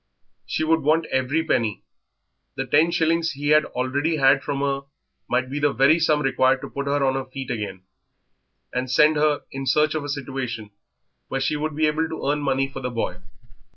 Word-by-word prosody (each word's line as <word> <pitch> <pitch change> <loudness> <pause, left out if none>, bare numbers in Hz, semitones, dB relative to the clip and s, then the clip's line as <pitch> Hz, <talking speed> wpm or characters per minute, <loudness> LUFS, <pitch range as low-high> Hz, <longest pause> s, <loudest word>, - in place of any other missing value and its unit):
She - - -1
would 165 +1 +3
want 160 +3 +2
every 130 +5 +1
penny; 110 -8 0 0.7
the 135 - -2
ten 150 +6 +3
shillings 165 -1 +1
he 145 +1 -3
had 150 0 +5
already 145 +6 -1
had 135 -1 +4
from 140 0 -3
her 140 -1 -1 0.4
might 125 +1 +1
be 140 +3 -4
the 145 0 +2
very 140 +5 +4
sum 155 -2 +2
required 130 0 +2
to 140 - -7
put 140 0 -4
her 140 0 +1
on 130 - +2
her 135 -1 -3
feet 130 -1 -7
again, 100 -5 -5 0.9
and 125 +1 -2
send 150 +5 +4
her 150 -1 +2
in 135 0 -5
search 150 +1 +3
of 155 -2 -2
a 145 - -6
situation 130 -6 -4 0.6
where 135 - -2
she 135 +3 0
would 155 0 -3
be 155 +1 +2
able 155 +1 0
to 160 - -5
earn 145 +1 +1
money 135 -1 +1
for 135 0 -8
the 125 -1 -3
boy. 115 -7 -3
140 Hz, 200 wpm, -23 LUFS, 130-155 Hz, 0.9 s, had